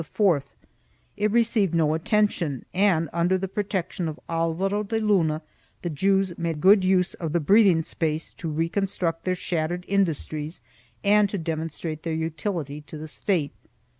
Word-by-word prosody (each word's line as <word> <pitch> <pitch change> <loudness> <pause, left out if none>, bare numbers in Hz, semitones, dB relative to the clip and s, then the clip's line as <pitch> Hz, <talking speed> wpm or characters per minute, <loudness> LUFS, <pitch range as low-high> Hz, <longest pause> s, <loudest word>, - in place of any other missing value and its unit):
2 185 -9 +4 0.7
It 210 +1 +1
received 220 -5 +2
no 155 -2 +3
attention 165 - 0
and, 180 -4 +3
under 175 +2 +2
the 195 +1 -3
protection 190 -3 -2
of 155 0 -5
Alvaro 165 +5 0
de 215 +2 -2
Luna, 175 -8 +2 0.4
the 175 - -2
Jews 190 +3 +1
made 165 -2 -2
good 195 +4 +6
use 185 -1 +2
of 160 -3 -4
the 170 - +3
breathing 185 0 +5
space 155 0 -2
to 165 - -5
reconstruct 165 +1 -1
their 185 0 +1
shattered 175 0 -2
industries 160 -4 -1 0.4
and 205 0 +4
to 200 - -3
demonstrate 160 -1 -4
their 165 - -3
utility 160 -2 -3
to 155 - -8
the 155 +1 -7
State. 160 -2 -1
170 Hz, 150 wpm, -25 LUFS, 160-195 Hz, 0.7 s, good